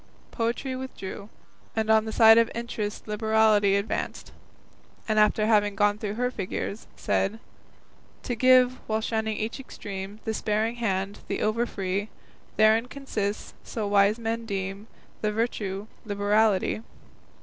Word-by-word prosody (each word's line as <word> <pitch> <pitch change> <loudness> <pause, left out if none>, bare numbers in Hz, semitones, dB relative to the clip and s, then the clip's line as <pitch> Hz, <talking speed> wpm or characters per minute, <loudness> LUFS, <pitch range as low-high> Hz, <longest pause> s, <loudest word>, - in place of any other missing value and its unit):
Poetry 240 +3 -2
withdrew, 215 -6 -7 0.5
and 220 0 +1
on 220 0 +4
the 220 - -4
side 225 0 +7
of 230 0 +3
Interest 225 -3 -4
Liberality 215 -2 +3
advanced, 200 +1 -3 0.8
and 215 -1 +2
after 215 0 +4
having 205 -2 +3
gone 205 +1 +2
through 210 -1 -3
her 250 +2 0
figures, 200 0 -4
said: 210 +3 0 0.8
To 250 - -2
give, 255 +1 +5
while 220 0 0
shunning 220 -1 -1
each 220 +5 -3
extreme, 200 -5 -7
The 220 - -1
sparing 220 +2 -1
hand, 200 -3 -2
the - - -2
over 230 +3 +1
free, 195 +1 -3 0.5
Therein 220 +2 +4
consists, 220 -7 -4
so 215 -3 -4
wise 200 +1 +4
men 230 0 -3
deem, 195 +1 -4 0.3
The 210 - +1
virtue 210 -3 -2 0.2
Liberality. 205 0 +1
215 Hz, 135 wpm, -26 LUFS, 205-230 Hz, 0.8 s, side